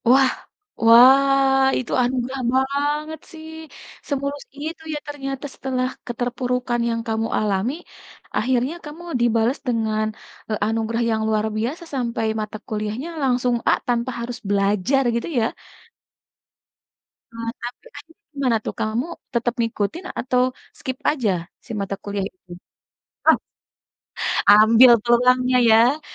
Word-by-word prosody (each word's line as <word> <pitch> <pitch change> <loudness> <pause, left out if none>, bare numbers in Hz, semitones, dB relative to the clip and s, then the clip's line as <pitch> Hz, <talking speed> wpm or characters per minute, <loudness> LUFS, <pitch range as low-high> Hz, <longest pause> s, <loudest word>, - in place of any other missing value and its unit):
Wah 260 0 +6 0.5
wah, 270 +3 +6
itu 250 - -6
anugerah 255 +1 -2
banget 290 +4 0
sih. 320 -1 -10 0.6
Semulus 280 0 -3 0.2
itu 320 +1 -6
ya - - -2
ternyata 275 -1 -5
setelah 255 -1 -2 0.2
keterpurukan 245 0 -2
yang 230 0 -1
kamu 225 0 -1
alami, 210 +4 0 0.6
akhirnya 255 +4 +1
kamu 300 +3 -9 0.2
dibales 235 +2 +2
dengan, 220 -2 0 0.4
eee, 215 - -1
anugerah 225 +1 -1
yang 220 0 0
luar 215 -1 +1
biasa 260 +11 -3
sampai 235 -3 -1 0.2
mata 215 0 -5
kuliahnya 215 +8 -3
langsung 250 -2 +2
A - - +6
tanpa 240 +1 0
harus 235 +1 -5
belajar 205 +6 +2
gitu 235 - -2
ya. 220 - +2 1.9
Eee, 230 0 -4
tapi 240 +1 -7
akhirnya 325 +7 -15
gimana 260 -5 +1
tuh, - - -3
kamu 220 +3 -1 0.3
tetap 240 0 0
ngikutin 230 - -2
atau 250 -1 +1 0.4
skip 260 -3 -4
aja 250 -9 0 0.3
si - - -10
mata 195 0 -3
kuliah 200 -1 -3
itu? 185 -2 -20 0.8
Oh. - - +6 1.1
Ambil 225 +4 +8
tulangnya 250 +1 +4
ya. 235 +6 +5
245 Hz, 120 wpm, -22 LUFS, 225-270 Hz, 1.9 s, Ambil